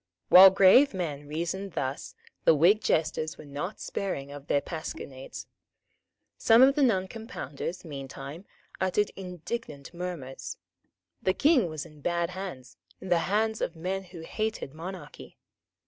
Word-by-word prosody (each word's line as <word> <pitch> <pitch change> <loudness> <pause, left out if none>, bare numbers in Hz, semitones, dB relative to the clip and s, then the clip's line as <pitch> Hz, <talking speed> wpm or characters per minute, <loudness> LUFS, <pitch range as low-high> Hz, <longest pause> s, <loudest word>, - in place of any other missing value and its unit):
While 190 +1 +11
grave 195 +7 +6
men 145 -5 -4
reasoned 170 +5 -3
thus, 135 0 -4 0.3
the 160 - +6
Whig 180 +8 +5
jesters 155 -2 0
were - - -11
not 145 +8 -5
sparing 140 -8 -4
of 145 0 -10
their 145 - +3
pasquinades. 140 -4 -7 0.9
Some 230 +2 +6
of 270 +1 +6
the 295 - 0
Noncompounders, 190 - -2
meantime, 140 +3 -8 0.3
uttered 190 +2 +1
indignant 180 - -6
murmurs. 170 -7 -6 0.6
The 185 - +1
King 275 - +4
was 155 -2 -5
in 150 -1 -15
bad 170 +2 0
hands, 165 -9 -7 0.2
in 190 - -8
the 175 -1 +4
hands 220 +2 +1
of 170 - -2
men 190 +4 -3
who 175 -2 -10
hated 215 -4 -3
monarchy. 180 +4 -9
175 Hz, 135 wpm, -28 LUFS, 150-195 Hz, 0.9 s, While